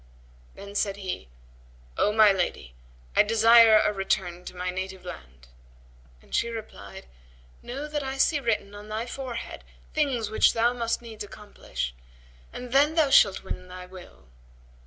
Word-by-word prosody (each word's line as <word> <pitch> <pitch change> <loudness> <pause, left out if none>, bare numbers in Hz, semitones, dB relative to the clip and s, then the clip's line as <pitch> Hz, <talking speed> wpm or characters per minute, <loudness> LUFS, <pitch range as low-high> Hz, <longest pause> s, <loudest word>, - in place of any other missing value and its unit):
Then 200 0 -10
said 200 -1 -1
he, 185 - -6 0.7
"O 210 - +2
my 215 -1 +6
lady, 175 - -2 0.4
I - - +7
desire 225 +1 +7
a 210 0 +2
return 180 -2 -2
to - - -9
my 180 0 -3
native 185 0 -6
land;" 65 - -11 0.8
and - - -19
she 235 - +1
replied, 225 - -9 0.6
"Know 275 +5 -6
that 300 -1 -3
I 265 0 -4
see 295 +2 +3
written 220 -5 -1
on 205 +1 -11
thy 220 +2 -3
forehead 250 -2 -6 0.3
things 255 -8 0
which 220 - +4
thou 235 +2 +2
must 235 -1 -2
needs 225 -3 -8
accomplish, 60 - -6 0.6
and 245 -1 -8
then 290 +4 +4
thou 310 -4 +3
shalt 200 -6 +5
win - - -5
to 180 - -16
thy 180 0 -9
will. 180 - -14
215 Hz, 155 wpm, -26 LUFS, 185-240 Hz, 0.8 s, I